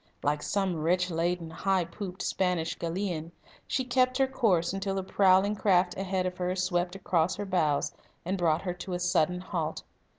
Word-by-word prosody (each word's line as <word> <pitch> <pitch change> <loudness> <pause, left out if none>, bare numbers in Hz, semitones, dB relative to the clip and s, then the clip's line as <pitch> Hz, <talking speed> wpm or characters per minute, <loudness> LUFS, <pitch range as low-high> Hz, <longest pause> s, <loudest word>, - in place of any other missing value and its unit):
Like 145 +1 +1
some 195 -2 0
rich 180 +3 +1
laden, 170 0 -1
high 190 +1 +1
pooped 185 +1 -6
Spanish 180 -3 0
galleon, 170 -1 -3 0.4
she 260 - 0
kept 255 +1 +2
her 270 - +4
course 195 -10 +1
until 195 0 -2
the 190 - -1
prowling 190 +1 +4
craft 180 -3 +2
ahead 190 -1 -1
of 180 0 -3
her 180 0 -1
swept 180 -1 0
across 180 -2 +1
her 205 - -4
bows 155 -6 +1 0.3
and 185 +3 0
brought 170 -3 +1
her 180 -2 -2
to 180 +1 -6
a 175 - -1
sudden 180 0 +1
halt. 165 -4 -3
180 Hz, 175 wpm, -29 LUFS, 170-195 Hz, 0.4 s, her